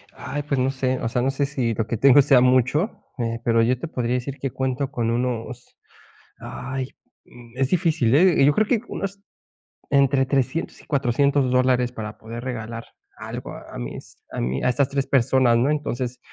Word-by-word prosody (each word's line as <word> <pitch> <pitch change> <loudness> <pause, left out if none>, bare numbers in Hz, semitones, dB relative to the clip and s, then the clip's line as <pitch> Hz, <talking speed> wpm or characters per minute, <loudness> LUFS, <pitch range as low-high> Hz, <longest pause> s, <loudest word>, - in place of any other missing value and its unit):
Ay, 145 0 -5
pues 140 -2 -1
no 130 +1 +1
sé. 130 -1 -1
O 115 - -2
sea, 120 - 0
no 135 +2 +1
sé 140 +1 0
si 130 -5 -1
lo 115 +1 -2
que 115 - -2
tengo 140 +4 +7
sea 135 -2 +5
mucho, 130 - +2
eh, 115 -1 -2
pero 115 -1 +3
yo 125 +2 +2
te 165 - -5
podría 125 -4 -2
decir, 135 +3 -4
que 135 -1 -3
cuento 130 +2 -2
con 115 -3 -1
unos 125 0 -3 0.6
ay, 130 0 -5 0.4
mm, 120 -1 -16
es 135 -1 +1
difícil, 160 -9 +2
¿eh? 175 0 +5
Eh, 135 - +7
yo 145 - +5
creo 215 0 +2
que 230 -4 +1
unos 195 0 -5 0.7
entre 140 -1 +3
$300 135 +4 -1
y - - -20
$400 140 0 +1
dólares, 125 -1 +2
para 110 -3 -7
poder 115 +2 -8
regalar 115 -2 -5 0.3
algo - - -7
a - - -10
mis - - -8
a - - -5
mi 65 +2 -2
A - - +3
estas 135 +2 +1
tres 140 -1 -1
personas, 130 -2 +3
¿no? 125 +4 +2
Entonces, 130 -4 -2
130 Hz, 195 wpm, -23 LUFS, 120-140 Hz, 0.7 s, tengo